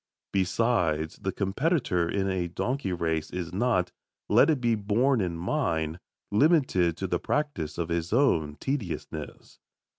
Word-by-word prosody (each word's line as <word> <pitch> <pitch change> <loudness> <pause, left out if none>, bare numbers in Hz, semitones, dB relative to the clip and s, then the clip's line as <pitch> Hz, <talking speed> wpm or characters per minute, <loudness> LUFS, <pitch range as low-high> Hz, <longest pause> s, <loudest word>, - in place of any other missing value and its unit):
Besides, 90 -5 +1
the 95 - -3
competitor 100 - 0
in 95 +1 0
a 95 -2 -1
donkey 120 +5 -2
race 80 -3 -1
is 90 -1 -5
not, 105 -3 +1 0.4
let - - +5
it 150 -4 +2
be 120 -1 +2
borne 110 +4 +2
in 85 -3 -2
mind, 85 - -1 0.3
limited 105 - +3
to 95 - -3
the 90 -2 0
practice 145 - -2
of 85 -1 -2
his 85 0 -2
own 85 - +2
tediousness. 100 - -5
95 Hz, 140 wpm, -27 LUFS, 85-125 Hz, 0.4 s, let